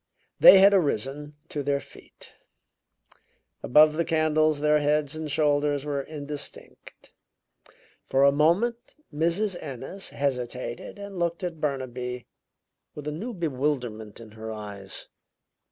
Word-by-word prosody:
They 195 - +10
had 200 +1 +7
arisen 145 - 0
to 145 - -3
their 140 0 0
feet; - - -16 1.3
above 150 +4 +5
the 165 +2 0
candles 155 -2 +2
their 150 0 +3
heads 150 0 0
and 155 -1 -5
shoulders 145 -1 +1
were 145 -2 -2
indistinct. 145 0 -8 1.0
For 135 +1 +3
a 140 - +7
moment 180 +12 +1 0.2
Mrs. 170 +5 0
Ennis 140 +7 -7
hesitated 125 -1 -4
and 200 -2 -8
looked 170 +1 -1
at 165 -3 -4
Burnaby 125 -4 -3 0.7
with 150 0 -7
a - - -1
new 200 +12 -5
bewilderment 130 - -3
in 115 -2 -12
her 110 +1 -7
eyes. 100 -3 -6
150 Hz, 120 wpm, -26 LUFS, 135-160 Hz, 1.3 s, They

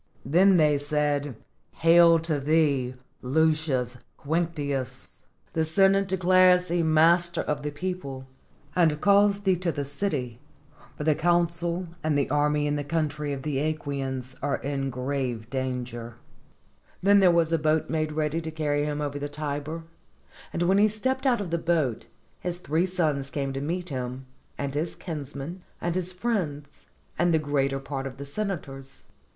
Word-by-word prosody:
Then 180 +7 +5
they 150 -3 +4
said, 145 -2 0 0.4
"Hail 165 0 +6
to 160 -3 -1
thee, 140 -4 +1 0.3
Lucius 140 -3 +1 0.2
Quinctius! 145 -4 -3 0.3
the 160 - +1
Senate 195 +4 +3
declares 185 -1 +4
thee 175 -1 0
master 165 +2 +4
of 150 -1 -2
the 150 - -3
people, 145 -5 -5 0.5
and 160 -4 +3
calls 200 +1 +4
thee 190 -2 +3
to 175 -1 -1
the 145 -2 -3
city, 140 - -2 0.6
for - - -4
the 155 0 +4
consul 170 +2 +1 0.2
and 155 -2 +1
the 140 - 0
army 150 0 +2
in 145 0 0
the 145 - -2
country 150 -1 -2
of 135 -1 -4
the 150 -3 -2 0.2
^quians 135 -3 -4
are 145 0 0
in 135 -1 -3
great 125 -3 -3
danger." 125 -3 -4 0.9
Then 200 +1 +6
therewas 170 -4 +4
a 165 - +2
boat 155 +1 +1
made 155 -1 -1
ready 155 +1 -1
to 160 - -5
carry 150 -2 -1
him 150 0 -2
over 145 -1 -3
the 145 0 -4
Tiber, 150 +2 -4 0.7
and 170 - -1
when 190 +3 +3
he 210 - +6
stepped 260 +6 -1
out 240 -5 +2
of 180 -5 -5
the 170 - 0
boat, 160 -9 0 0.3
his 175 -1 -3
three 165 +2 0
sons 155 -7 0
came 140 -1 -3
to 135 - -3
meet 175 +4 -3
him, 130 -1 -5 0.3
and 140 -1 -3
his 155 +4 -2
kinsmen 150 +1 -6 0.2
and 175 - -1
his 185 0 -2
friends, 180 -9 -3 0.3
and 175 +1 +3
the 160 - +4
greater 140 -2 0
part 135 0 -4
of 130 -1 -9
the 140 - -7
senators. 140 -6 -5
155 Hz, 160 wpm, -26 LUFS, 140-175 Hz, 0.9 s, Hail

